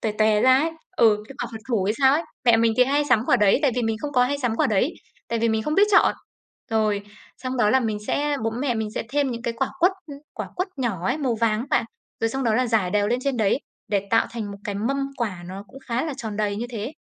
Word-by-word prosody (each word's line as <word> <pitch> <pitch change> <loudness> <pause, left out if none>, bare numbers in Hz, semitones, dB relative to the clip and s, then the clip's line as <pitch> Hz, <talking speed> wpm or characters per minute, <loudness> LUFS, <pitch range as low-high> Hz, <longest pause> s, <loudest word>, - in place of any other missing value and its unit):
toè 220 -2 -1
tòe 215 0 +3
ra 260 +2 +6
ấy, 325 +2 0 0.3
ừ, 215 -7 +4
cái 275 - -10
quả 240 - -4
phật 225 - -6
thủ 220 -7 +1
hay 210 - +1
sao 265 -1 +5
ấy. 320 - +1 0.2
Mẹ 235 -2 +6
mình 230 0 +3
thì 250 - +6
hay 285 +3 +1
sắm 225 - +4
quả - - +4
đấy, 210 -2 +4
tại 275 - +3
vì 245 - +1
mình 225 -1 0
không 290 -1 -3
có 250 -2 +4
hay 285 +3 -1
sắm 245 -4 -1
quả - - +3
đấy, 220 - +1 0.4
tại 230 - -1
vì 230 +1 +1
mình 220 0 0
không 300 - -1
biết 405 +4 +5
chọn. 405 - +5 0.6
Rồi, 215 -2 +1 0.4
xong 255 0 -4
đó 210 -3 +3
là 265 - +4
mình 220 -3 -1
sẽ 290 0 0
bố 225 - +1
mẹ 245 +2 -1
mình 220 -1 -2
sẽ - - -2
thêm 285 -2 +1
những 235 -1 -5
cái 235 - -2
quả 270 - 0
quất, 365 +2 +4
ừm, 285 -2 -9 0.2
quả - - -5
quất 365 +2 -1
nhỏ 200 -8 -2
ấy, 260 +5 0
màu 260 -6 0
vàng 215 -2 +2
á 245 - -5
bạn. - - +2 0.4
Rồi 225 - +2
xong 265 +3 -3
đó 225 -2 +2
là 255 +3 +2
rải 215 -6 +1
đều 205 0 +2
lên 240 +2 +1
trên 275 -2 0
đấy 215 +1 +2 0.3
để 200 -1 0
tạo 225 - +3
thành 225 -3 -5
một 200 - -10
cái 205 - -3
mâm 230 +7 -1 0.2
quả 200 -8 -3
nó 190 +2 -8
cũng 270 - -13
khá 240 +3 0
là 310 -3 -3
tròn 220 -3 -5
đầy 205 -1 -1
như 235 - -3
thế. 225 +4 -5
230 Hz, 290 wpm, -24 LUFS, 215-265 Hz, 0.6 s, ra